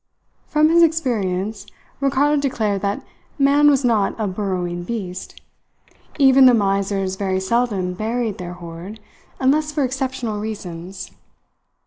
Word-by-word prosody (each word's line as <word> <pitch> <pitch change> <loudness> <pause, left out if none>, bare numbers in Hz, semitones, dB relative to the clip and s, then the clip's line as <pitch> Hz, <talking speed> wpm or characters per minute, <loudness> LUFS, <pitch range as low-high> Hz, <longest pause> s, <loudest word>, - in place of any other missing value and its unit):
From 305 +1 +3
his 340 +1 +5
experience, 220 - 0 0.3
Ricardo 275 +2 +2
declared 215 -8 -1
that 200 0 -2 0.3
man 285 +1 +5
was 275 -2 +2
not 220 -3 +1
a 215 - 0
burrowing 185 -3 -3
beast. 185 -3 -6 0.8
Even 265 -2 +7
the 250 - +6
misers 195 -2 0
very 190 -1 -1
seldom 195 -3 0
buried 225 +2 -2
their 175 -1 -6
hoard, 175 +4 -9 0.4
unless 300 +3 +2
for 295 -1 0
exceptional 255 -4 -2
reasons. 190 -3 -7
215 Hz, 120 wpm, -21 LUFS, 190-265 Hz, 0.8 s, Even